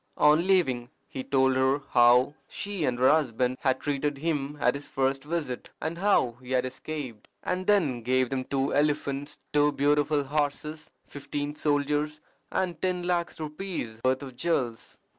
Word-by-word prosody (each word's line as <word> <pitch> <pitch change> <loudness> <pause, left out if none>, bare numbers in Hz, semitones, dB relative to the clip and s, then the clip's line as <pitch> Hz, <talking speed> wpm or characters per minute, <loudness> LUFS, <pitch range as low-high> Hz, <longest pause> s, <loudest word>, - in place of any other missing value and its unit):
On 155 +4 +5
leaving 130 -11 +2 0.2
he 130 - -6
told 130 -1 +2
her 135 +2 +2
how 125 +3 +5 0.2
she 200 -6 -3
and 125 -2 0
her 130 +1 +4
husband 130 -4 +1
had 130 -2 +1
treated 145 0 -1
him 150 -1 -2
at 125 -1 +3
his 140 +1 -7
first 135 0 0
visit, 150 -5 -4
and 170 +2 -4
how 175 - +2
he 125 - -12
had 130 0 +2
escaped; 130 -3 -6 0.2
and 185 +1 -2
then 160 - +3
gave 130 +2 +1
them 130 -1 -2
two 135 -1 -1
elephants, 145 -1 0 0.2
two 150 0 +4
beautiful 145 +1 +2
horses, 150 +2 -2 0.2
fifteen 145 +1 -5
soldiers, 150 0 0 0.3
and 185 -2 -1
ten 180 -1 0
lacs 175 -2 -1
rupees' 150 - -5
worth 130 +2 +1
of 130 -2 -9
jewels. 125 -7 -2
145 Hz, 160 wpm, -27 LUFS, 130-155 Hz, 0.3 s, On